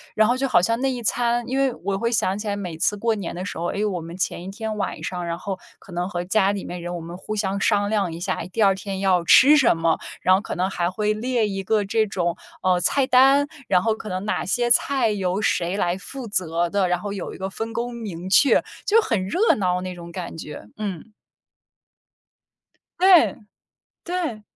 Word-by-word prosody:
然 215 0 +4
后 245 - +2
就 270 +1 -1
好 175 - +5
像 230 +5 +1
那 270 0 +1
一 250 -2 -4
餐 235 +1 0
因 260 +1 -2
为 270 -2 +2
我 195 -1 0
会 230 +3 -1
想 195 -4 +1
起 210 +1 -6
来 200 - -1
每 180 -5 -5
次 210 +5 +1
过 225 +2 0
年 195 -5 -5
的 180 +2 -5
时 - - -6
候， 170 - -2
哎 - - -5
哟， 210 +1 +1
我 180 -3 -3
们 165 +2 -9
前 180 -2 -2
1 185 - -7
天 220 +1 -4
晚 205 - -3
上， 180 -1 -4
然 170 0 -3
后， 190 +1 -4 0.2
可 185 - -14
能 175 +2 -2
和 175 -2 -3
家 195 +1 +2
里 200 -2 -4
面 175 0 -6
人 175 +1 -5
我 175 - -4
们 170 +1 -8
互 215 +3 -5
相 200 -1 -1
商 205 -1 +2
量 205 -5 0
一 165 - -7
下， 185 +1 -2
第 225 - -2
2 195 -2 +5
天 190 0 -5
要 185 -3 +2
吃 265 - +7
什 255 - +4
么， 165 0 +2 0.2
然 185 - +5
后 190 - 0
可 - - -5
能 185 +2 0
还 175 -2 -1
会 210 +2 0
列 235 0 0
一 195 -1 -4
个 210 +1 +1
这 220 +2 +1
种， 175 -4 -1 0.3
呃， 180 -1 +2
菜 270 +8 +2
单， 270 +3 +5 0.2
然 180 -2 +4
后 225 +3 +1
可 215 - -8
能 185 +1 -3
哪 215 - -1
些 240 +4 0
菜 265 +1 +3
由 190 -2 -1
谁 180 -2 0
来 175 -2 0
负 260 +5 -8
责 175 -4 -1
的， 195 0 +1
然 180 0 0
后 205 +1 -5
有 195 - -5
一 - - -9
个 190 0 -4
分 225 +4 -5
工 240 +2 -3
明 190 -6 -6
确， 270 +8 +5 0.2
就 440 +2 +5
很 210 - -1
热 380 - +3
闹 180 -3 0
那 185 0 -5
种 170 -1 -10
感 175 -1 -6
觉。 150 -9 -8
嗯。 205 -1 -5 1.9
对， 365 -2 +6 0.7
对。 340 -12 -3
200 Hz, 245 characters per minute, -23 LUFS, 180-230 Hz, 1.9 s, 吃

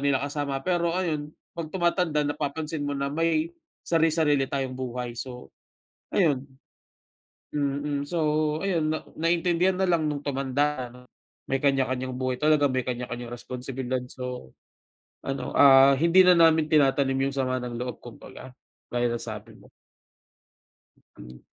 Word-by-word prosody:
nila 135 -1 +3
kasama 140 -2 -3
pero 175 -1 0
ayun 155 -5 -2 0.2
'pag 165 -2 -5
tumatanda 170 -3 +1
napapansin 150 +2 -3
mo 145 0 -2
na 140 +1 -2
may 165 +1 0 0.3
sari-sarili 160 -4 +2
tayong 135 -2 -2
buhay. 125 -1 -4
So, 125 +1 -8 0.6
ayun. 145 -7 +2 1.1
Mm, 145 0 -1
so, 155 -2 +1
ayun 165 -5 +1
na 155 - -3
naintindihan 175 +2 +1
na 190 - +2
lang 165 -4 +1
nung 145 -1 -5
tumanda 135 -1 -1
ano, 125 +1 -15 0.4
may 135 0 -1
kanya-kanyang 130 -2 0
buhay 130 -1 -2
talaga, 150 -1 +4
may 130 - +1
kanya-kanyang 120 -1 -5
responsibilidad. 125 +1 -4
So, 125 - -7 0.7
ano, 135 0 -4
ah, 135 -1 +7
hindi 170 +6 +5
na 180 - +7
namin 165 -2 +5
tinatanim 135 -2 +3
yung 140 - -8
sama 130 -1 0
ng 120 -1 -5
loob 125 +1 -5
kumbaga. 125 +2 -11 0.4
Gaya 120 0 +1
ng 120 - -1
sabi 110 0 -7
mo. - - -19 1.5
Hmm. 60 +1 -12
140 Hz, 135 wpm, -26 LUFS, 130-160 Hz, 1.5 s, ah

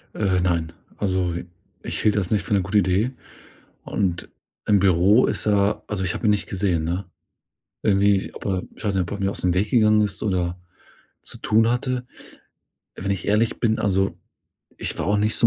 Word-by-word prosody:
Äh, 95 -3 +1
nein, 85 -3 0 0.3
also 95 -3 0 0.5
ich - - -3
hielt 105 -1 +3
das 95 -4 0
nicht 105 - +2
für 110 - -1
'ne 100 - +3
gute 95 +4 0
Idee 95 +7 +1 0.7
und 90 -4 -2 0.4
im 100 -1 +4
Büro 95 +5 +4
ist - - -2
er 105 0 +2
also 95 -3 -2
ich 90 - -1
habe - - -2
ihn 105 - +5
nicht 105 - 0
gesehen, 90 -4 0
ne? 90 +4 -2 0.8
Irgendwie, 100 -1 +2
ob - - -10
er 95 -2 -1
ich - - -11
weiß 105 -2 0
nicht, 95 - +2
ob 85 - -8
er 100 - -4
mir 100 0 0
ausm 90 -3 0
Weg 100 +3 0
gegangen 110 -3 +5
ist 100 -1 -2
oder 90 -3 -1 0.7
zu - - -5
tun 110 +2 +3
hatte. 125 0 -1 0.9
Wenn 100 +1 -3
ich 95 - -4
ehrlich 105 +2 +1
bin, 110 -2 +2
also, 95 -1 +1 0.6
ich - - -3
war - - -2
auch 105 +1 +2
nicht 105 +1 +1
so 115 - +4
100 Hz, 195 wpm, -23 LUFS, 95-105 Hz, 0.9 s, ihn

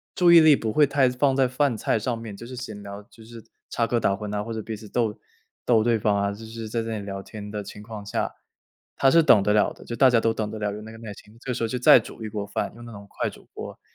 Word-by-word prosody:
注 175 -2 +5
意 170 - +10
力 155 -3 +7
不 110 -4 -3
会 150 -2 +5
太 135 -2 +3
放 130 +2 +1
在 135 -1 +3
饭 130 -2 0
菜 110 - 0
上 120 +2 -2
面， 115 -3 -8
就 115 - -10
是 130 - -8
闲 110 -5 -7
聊， 100 0 -9
就 110 +2 -18
是 115 -1 -12 0.3
插 115 - 0
科 120 +1 0
打 100 - +2
诨 105 +1 -6
呐， 105 0 -2
或 115 - -7
者 110 - -3
彼 110 - -5
此 105 0 -12
逗 115 -2 0 0.5
逗 115 -3 +4
对 115 -2 +2
方 105 -1 +1
啊。 100 0 0
就 105 +3 -9
是 115 0 -7
在 115 +1 -2
这 115 -1 -4
里 100 - -7
聊 95 -1 -5
天 105 0 -9
的 105 -1 -4
情 105 +1 -10
况 110 -2 -8
下， - - -2 0.6
他 135 - +4
是 165 - +6
等 110 -10 +5
得 105 - +2
了 105 - +3
的， - - -15
就 120 - -5
大 130 +1 +6
家 120 - +4
都 115 0 +1
等 105 -1 -3
得 110 - -6
了， 105 -1 -2
有 105 - -7
那 110 - -10
个 110 - -11
耐 110 -3 -8
心， 105 +3 -17
这 125 -2 -3
时 115 - -3
候 - - +1
就 125 +3 -3
再 125 0 +7
煮 110 - -10
一 - - -4
锅 105 -1 -4
饭， - - -3
用 120 - -12
那 120 - -10
种 100 -2 -10
快 - - -3
煮 - - -16
锅， - - -8
110 Hz, 325 characters per minute, -24 LUFS, 105-120 Hz, 0.6 s, 意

